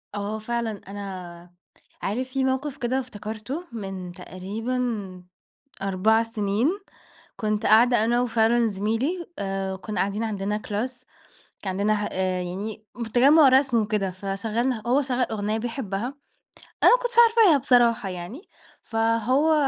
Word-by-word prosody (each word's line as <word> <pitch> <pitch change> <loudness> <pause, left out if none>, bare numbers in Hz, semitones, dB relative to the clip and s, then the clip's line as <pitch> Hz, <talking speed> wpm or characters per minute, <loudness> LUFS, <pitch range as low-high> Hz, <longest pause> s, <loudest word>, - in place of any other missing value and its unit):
آه، 205 +2 -3
فعلًا 225 -2 -3
أنا 185 -4 -8 0.5
عارف 250 +6 -2
في 270 0 -1
موقف 265 +2 -1
كده 255 +2 0
افتكرته 225 - -6
من 195 -5 -6
تقريبًا 200 +1 -4 0.6
4 195 +4 +3
سنين. 220 +1 0 0.7
كنت 215 -1 -1
قاعدة 235 +1 +5
أنا 240 +2 +2
وفعلًا 235 0 +2
زميلي 225 - -1
آآ، 195 -1 -2
كنّا 210 +3 -5
قاعدين 200 +3 0
عندنا 210 -1 -2
class 245 +5 -3 0.6
كان 195 - -3
عندنا 210 +1 +2
ح 210 - -2
آآ، 185 -1 -1
يعني 205 +5 -5 0.3
تجمع 280 +4 +7
رسم 260 -2 +4
وكده، 210 -3 0
فشغلنا 215 +6 -2
هو 260 +4 +3
شغّل 255 -2 0
أغنية 215 0 -1
بيحبها، 225 -3 -3 0.8
أنا - - +8
ما - - -4
كُنتش 485 -1 -2
عارفاها 440 -9 +5
بصراحة 240 -6 +3
يعني، 180 - -7 0.4
فهو 230 +7 +2
220 Hz, 130 wpm, -25 LUFS, 200-250 Hz, 0.8 s, أنا